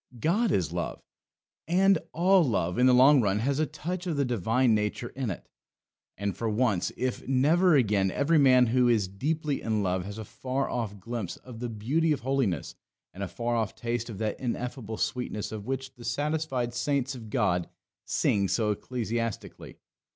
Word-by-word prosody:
God 200 Hz, -, +2 dB
is 90 Hz, -, +1 dB
Love; 85 Hz, -, -3 dB, 0.7 s
and 190 Hz, +3 st, +4 dB
all 185 Hz, +2 st, +4 dB
love, 100 Hz, -, 0 dB
in 125 Hz, -, +5 dB
the -, -, +6 dB
long 130 Hz, +2 st, +7 dB
run, 100 Hz, -2 st, +1 dB
has 135 Hz, +6 st, 0 dB
a 155 Hz, -, +1 dB
touch 175 Hz, +4 st, -5 dB
of 160 Hz, -4 st, -1 dB
the 140 Hz, -, +2 dB
divine 120 Hz, +1 st, +2 dB
nature 105 Hz, +3 st, -1 dB
in 130 Hz, -3 st, -4 dB
it. 95 Hz, -, -6 dB, 0.7 s
And 100 Hz, -2 st, -2 dB
for 115 Hz, +3 st, -2 dB
once, 105 Hz, -5 st, +1 dB
if 130 Hz, -1 st, -3 dB
never 155 Hz, +7 st, +4 dB
again, 105 Hz, -7 st, +3 dB
every 150 Hz, -, +2 dB
man 130 Hz, -3 st, +6 dB
who 125 Hz, +1 st, +3 dB
is 110 Hz, -5 st, +2 dB
deeply 145 Hz, +9 st, -2 dB
in 110 Hz, -2 st, 0 dB
love 90 Hz, -1 st, 0 dB
has 100 Hz, +1 st, -7 dB
a 110 Hz, -, -6 dB
far 130 Hz, +5 st, -3 dB
off 105 Hz, -4 st, -3 dB
glimpse 115 Hz, -2 st, -5 dB
of 125 Hz, -3 st, -11 dB
the 120 Hz, 0 st, -3 dB
beauty 135 Hz, +10 st, 0 dB
of 145 Hz, -, -4 dB
holiness, 130 Hz, -7 st, -1 dB, 0.4 s
and 95 Hz, -, -9 dB
a 100 Hz, -, -2 dB
far 120 Hz, +7 st, -2 dB
off 110 Hz, -2 st, -1 dB
taste 120 Hz, 0 st, -3 dB
of 110 Hz, -, -7 dB
that 110 Hz, 0 st, -2 dB
ineffable 120 Hz, -2 st, -4 dB
sweetness 125 Hz, -4 st, -2 dB
of 110 Hz, -1 st, -7 dB
which 135 Hz, 0 st, -3 dB
the 120 Hz, -, -13 dB
satisfied 135 Hz, -1 st, -1 dB
saints 140 Hz, +1 st, 0 dB
of 115 Hz, -4 st, -9 dB
God 90 Hz, -4 st, 0 dB, 0.3 s
sing 100 Hz, -1 st, +1 dB
so 105 Hz, +1 st, +1 dB
ecstatically. 115 Hz, 0 st, -4 dB
120 Hz, 180 wpm, -28 LUFS, 105-140 Hz, 0.7 s, long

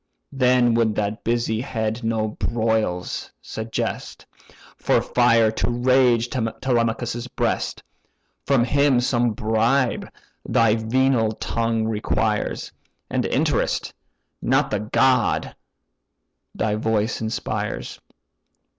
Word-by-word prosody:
Then 125 Hz, -3 st, +3 dB
would 115 Hz, -2 st, +2 dB
that 105 Hz, +1 st, -2 dB
busy 115 Hz, -1 st, 0 dB
head 115 Hz, -2 st, -3 dB
no 110 Hz, -1 st, 0 dB
broils 110 Hz, -5 st, -1 dB
suggest, 110 Hz, 0 st, -5 dB, 0.5 s
For -, -, +2 dB
fire 115 Hz, -3 st, +3 dB
to 110 Hz, -, -1 dB
rage 120 Hz, -1 st, +3 dB
Telemachus' 120 Hz, -1 st, -1 dB
breast, -, -, -2 dB, 0.6 s
From 135 Hz, -4 st, +3 dB
him 140 Hz, 0 st, +3 dB
some 120 Hz, -2 st, +1 dB
bribe 115 Hz, +5 st, 0 dB, 0.3 s
thy 115 Hz, -2 st, +3 dB
venal 115 Hz, 0 st, +1 dB
tongue 115 Hz, 0 st, -1 dB
requires, 110 Hz, -1 st, -1 dB, 0.4 s
And -, -, 0 dB
interest, -, -, 0 dB, 0.5 s
not 135 Hz, +3 st, +1 dB
the 105 Hz, -, 0 dB
god, 125 Hz, +5 st, +1 dB, 1.0 s
thy 110 Hz, -, 0 dB
voice 110 Hz, +1 st, 0 dB
inspires. 110 Hz, +1 st, -4 dB
115 Hz, 95 wpm, -22 LUFS, 110-125 Hz, 1.0 s, Then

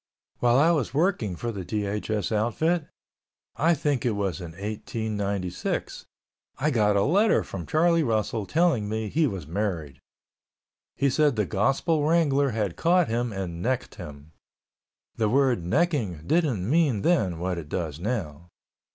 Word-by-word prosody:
While 120 Hz, 0 st, +4 dB
I 160 Hz, +5 st, +5 dB
was 140 Hz, -6 st, -1 dB
working 150 Hz, -, +1 dB
for 120 Hz, +6 st, -4 dB
the 100 Hz, -4 st, -6 dB
DHS 105 Hz, 0 st, -2 dB
outfit, 145 Hz, +10 st, 0 dB, 0.7 s
I 165 Hz, +3 st, +3 dB
think 145 Hz, -4 st, -1 dB
it 120 Hz, -4 st, 0 dB
was 95 Hz, -5 st, -2 dB
in 85 Hz, -2 st, -8 dB
1896, 100 Hz, -1 st, -3 dB, 0.5 s
I 150 Hz, +3 st, +1 dB
got 105 Hz, -5 st, +2 dB
a 100 Hz, -, +3 dB
letter 205 Hz, -, +3 dB
from 90 Hz, -4 st, -7 dB
Charlie 170 Hz, +1 st, +3 dB
Russell 110 Hz, -5 st, -1 dB
telling 155 Hz, -11 st, +2 dB
me 110 Hz, 0 st, -2 dB
he 155 Hz, +4 st, +2 dB
was 95 Hz, -, -5 dB
married. 80 Hz, -6 st, -3 dB, 1.0 s
He 140 Hz, -, +1 dB
said 150 Hz, -1 st, +3 dB
the 105 Hz, -2 st, +1 dB
gospel 135 Hz, -, +1 dB
wrangler 145 Hz, -3 st, +3 dB
had 105 Hz, -6 st, -2 dB
caught 175 Hz, -2 st, +3 dB
him 120 Hz, +1 st, -1 dB
and 90 Hz, -4 st, -5 dB
necked 130 Hz, +4 st, -1 dB
him. 75 Hz, +1 st, -10 dB, 0.9 s
The 110 Hz, -2 st, +1 dB
word 130 Hz, -6 st, +2 dB
"necking" 110 Hz, -, 0 dB
didn't 135 Hz, -, +1 dB
mean 140 Hz, -7 st, +2 dB
then 105 Hz, -, +2 dB
what 90 Hz, +1 st, -2 dB
it 75 Hz, -3 st, -9 dB
does 80 Hz, -3 st, -3 dB
now. 90 Hz, -, -4 dB
110 Hz, 150 wpm, -26 LUFS, 95-145 Hz, 1.0 s, I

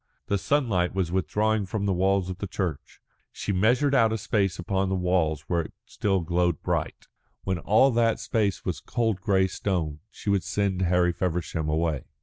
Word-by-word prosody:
The 100 Hz, -, 0 dB
sunlight 100 Hz, -11 st, +1 dB
was 90 Hz, -3 st, 0 dB
withdrawing 105 Hz, +3 st, 0 dB
from 100 Hz, +1 st, -2 dB
the 100 Hz, -, +1 dB
walls 95 Hz, +1 st, +1 dB
of 90 Hz, -, -8 dB
the 100 Hz, -, -3 dB
church. 90 Hz, -6 st, -4 dB, 0.3 s
She -, -, -4 dB
measured 125 Hz, +9 st, +2 dB
out 115 Hz, -4 st, +4 dB
a 110 Hz, -, 0 dB
space 100 Hz, -3 st, 0 dB
upon 95 Hz, +2 st, -1 dB
the 95 Hz, -, 0 dB
walls 90 Hz, -5 st, +1 dB
where 85 Hz, +2 st, -1 dB
it 80 Hz, -, -9 dB
still 95 Hz, -3 st, 0 dB
glowed 85 Hz, -1 st, 0 dB
bright. -, -, -2 dB, 0.4 s
When 95 Hz, -2 st, -1 dB
all 110 Hz, +10 st, +4 dB
that 115 Hz, -1 st, +2 dB
space 105 Hz, -4 st, -1 dB
was 85 Hz, -6 st, -2 dB
cold 110 Hz, -6 st, -1 dB
grey 95 Hz, -1 st, +3 dB
stone, 90 Hz, -6 st, -2 dB
she 105 Hz, -, -4 dB
would 100 Hz, -1 st, +2 dB
send 100 Hz, -2 st, -1 dB
Harry 90 Hz, -1 st, +2 dB
Feversham 85 Hz, -4 st, -2 dB
away. 80 Hz, -2 st, 0 dB
95 Hz, 180 wpm, -26 LUFS, 90-105 Hz, 0.4 s, out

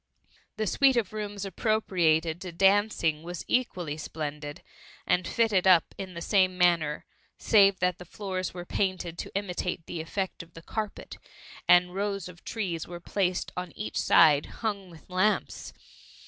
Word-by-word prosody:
The 215 Hz, -, -1 dB
suit 265 Hz, +7 st, +4 dB
of 215 Hz, -4 st, 0 dB
rooms 205 Hz, -2 st, -4 dB
appropriated 175 Hz, -6 st, +1 dB
to 185 Hz, -, -6 dB
dancing 190 Hz, -4 st, +2 dB
was 175 Hz, +1 st, -7 dB
equally 180 Hz, -12 st, -1 dB
splendid, 150 Hz, -1 st, -6 dB, 0.4 s
and 180 Hz, -, +1 dB
fitted 210 Hz, -5 st, +2 dB
up 180 Hz, -3 st, +5 dB
in 190 Hz, -2 st, -7 dB
the 170 Hz, -, -5 dB
same 185 Hz, -3 st, +2 dB
manners 170 Hz, -4 st, +2 dB, 0.3 s
save 200 Hz, -3 st, +5 dB
that 180 Hz, -1 st, +1 dB
the 180 Hz, -, -9 dB
floors 185 Hz, 0 st, -4 dB
were 175 Hz, -1 st, -8 dB
painted 185 Hz, -3 st, -2 dB
to -, -, -7 dB
imitate 180 Hz, -3 st, -3 dB
the 165 Hz, -, -5 dB
effect 190 Hz, +4 st, -4 dB
of 165 Hz, -1 st, -16 dB
the 165 Hz, -, -11 dB
carpet, 215 Hz, +1 st, -5 dB, 0.5 s
and 180 Hz, 0 st, +5 dB
rows 200 Hz, -1 st, -2 dB
of 175 Hz, -1 st, -13 dB
trees 180 Hz, -8 st, -3 dB
were 175 Hz, 0 st, -7 dB
placed 185 Hz, 0 st, -1 dB
on 180 Hz, -1 st, -5 dB
each 110 Hz, -, -4 dB
side, 145 Hz, -2 st, +5 dB
hung 200 Hz, -4 st, -4 dB
with 165 Hz, -2 st, -16 dB
lamps. 185 Hz, +3 st, 0 dB
180 Hz, 155 wpm, -28 LUFS, 170-200 Hz, 0.5 s, up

